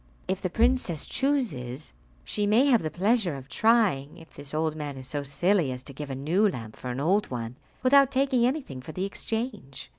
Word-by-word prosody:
If 190 Hz, +1 st, -1 dB
the 185 Hz, -, -1 dB
princess 225 Hz, -, +1 dB
chooses, 200 Hz, -, -2 dB, 0.3 s
she 205 Hz, -1 st, -1 dB
may 225 Hz, +6 st, +5 dB
have 250 Hz, -6 st, +4 dB
the 155 Hz, -, -2 dB
pleasure 190 Hz, -, +1 dB
of 135 Hz, -1 st, -9 dB
trying 195 Hz, -9 st, +2 dB
if 165 Hz, -1 st, -15 dB
this 145 Hz, -1 st, -7 dB
old 155 Hz, 0 st, 0 dB
man 145 Hz, -3 st, -5 dB
is 130 Hz, -1 st, -8 dB
so 145 Hz, +2 st, -2 dB
silly 155 Hz, +2 st, +1 dB
as 125 Hz, 0 st, -6 dB
to 140 Hz, -, -9 dB
give 145 Hz, +1 st, -7 dB
a 135 Hz, -, -3 dB
new 170 Hz, +10 st, +2 dB
lamp 115 Hz, -, -7 dB
for 125 Hz, -, -7 dB
an 125 Hz, +1 st, -3 dB
old 195 Hz, +8 st, +2 dB
one, 120 Hz, -1 st, -5 dB, 0.3 s
without 275 Hz, +1 st, +6 dB
taking 265 Hz, -2 st, +2 dB
anything 250 Hz, -, -1 dB
for 155 Hz, -, -9 dB
the 185 Hz, +4 st, -2 dB
exchange." 220 Hz, -, -5 dB
170 Hz, 205 wpm, -27 LUFS, 140-230 Hz, 0.3 s, without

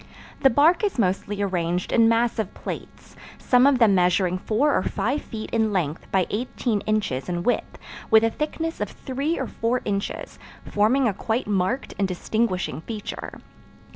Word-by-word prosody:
The 270 Hz, -, +5 dB
bark 305 Hz, -, +4 dB
is 405 Hz, -7 st, 0 dB
mostly 200 Hz, 0 st, 0 dB
arranged 175 Hz, -2 st, -1 dB
in 230 Hz, -1 st, +5 dB
massive 230 Hz, -3 st, +1 dB
plates, -, -, -8 dB, 0.2 s
some 250 Hz, +1 st, +4 dB
of 280 Hz, -2 st, +4 dB
them 225 Hz, -5 st, +5 dB
measuring 180 Hz, 0 st, +2 dB
four 265 Hz, +10 st, +1 dB
or -, -, +2 dB
five 265 Hz, +9 st, -1 dB
feet 215 Hz, -1 st, -7 dB
in 220 Hz, -2 st, +1 dB
length 165 Hz, -5 st, -2 dB
by 190 Hz, -2 st, +2 dB
eighteen 230 Hz, -1 st, -1 dB
inches 205 Hz, -11 st, -1 dB
in 175 Hz, -1 st, -2 dB
width, 245 Hz, -, -1 dB, 0.3 s
with 220 Hz, 0 st, +6 dB
a 225 Hz, -, +2 dB
thickness 325 Hz, +2 st, -3 dB
of 210 Hz, -, -1 dB
three 275 Hz, +5 st, -3 dB
or 265 Hz, -, -2 dB
four 235 Hz, +2 st, -1 dB
inches, 200 Hz, -1 st, -3 dB, 0.3 s
forming 235 Hz, +6 st, +2 dB
a 210 Hz, -, +1 dB
quite 220 Hz, +5 st, -2 dB
marked 205 Hz, +6 st, -1 dB
and 195 Hz, -, +2 dB
distinguishing 185 Hz, -2 st, -1 dB
feature. 215 Hz, +2 st, -6 dB
220 Hz, 165 wpm, -24 LUFS, 190-250 Hz, 0.3 s, with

